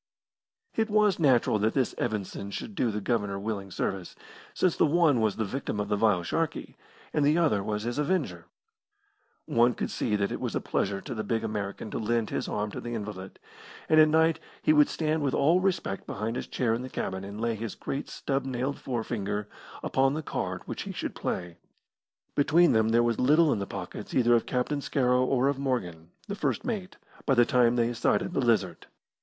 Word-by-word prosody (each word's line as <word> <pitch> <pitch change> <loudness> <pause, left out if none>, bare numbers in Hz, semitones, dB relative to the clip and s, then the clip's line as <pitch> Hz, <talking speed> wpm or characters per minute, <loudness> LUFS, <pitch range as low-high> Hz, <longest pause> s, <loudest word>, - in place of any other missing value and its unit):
It 225 0 0
was 210 -3 +3
natural 125 -8 +3
that 110 +2 +1
this 130 -3 +1
Evanson 100 -3 -3
should 205 - -6
do 125 -11 +1
the 105 -1 -3
Governor 100 -3 -1
willing 100 -1 -4
service, 95 0 -3 0.4
since 180 -3 +1
the - - +3
one 150 -6 +3
was 110 -3 +1
the 110 - -1
victim 110 -1 -3
of 105 0 -2
the 105 - +2
vile 100 -4 +2
Sharkey 165 - -2 0.4
and 150 - +2
the 150 +3 +4
other 150 -12 +2
was 105 +1 -2
his 120 +4 -2
avenger. 180 +5 -1 1.0
One 120 -5 +3
could - - -3
see 105 - 0
that 100 -1 0
it - - -4
was - - -2
a - - +1
pleasure 100 0 -1
to - - -6
the 110 -2 -3
big 115 +2 -1
American 105 -1 -4
to - - -3
lend 115 0 0
his - - -2
arm 105 0 -2
to - - -6
the 120 0 -4
invalid, 100 -3 -6 0.5
and 155 - +5
at 155 - +8
night 160 +1 +3 0.2
he 155 - +5
would 150 -1 +5
stand 155 -1 0
with 140 -2 0
all 165 +6 +4
respect 180 - -1
behind 110 +3 -3
his - - -4
chair 120 -3 0
in 115 - -1
the 130 - -6
cabin 95 -5 -3
and 100 +2 -7
lay 115 0 0
his 110 0 -5
great 140 +1 -4
stub 135 0 -2
nailed 130 +1 -2
forefinger 105 -4 -3 0.4
upon 135 +1 +2
the 155 - -3
card - - -3
which - - -5
he - - -5
should - - -4
play. 90 -1 -4 0.7
Between 165 +4 +4
them 110 -1 +3
there 115 +1 +4
was 120 -1 0
little 150 +4 +5
in - - -2
the 100 - -4
pockets 95 +1 -7
either 120 -1 +4
of 115 - +2
Captain 140 +3 -1
Scarrow 125 -3 +2
or 130 0 +2
of 140 -1 0
Morgan, 90 -12 -2 0.2
the 200 - -3
first 200 - -1
mate, 210 -7 -4 0.3
by 135 - +4
the 120 -1 +6
time 120 -1 +3
they 120 0 +1
sighted 120 +8 0
the 140 - +1
Lizard. 110 -8 +1
120 Hz, 205 wpm, -28 LUFS, 105-145 Hz, 1.0 s, at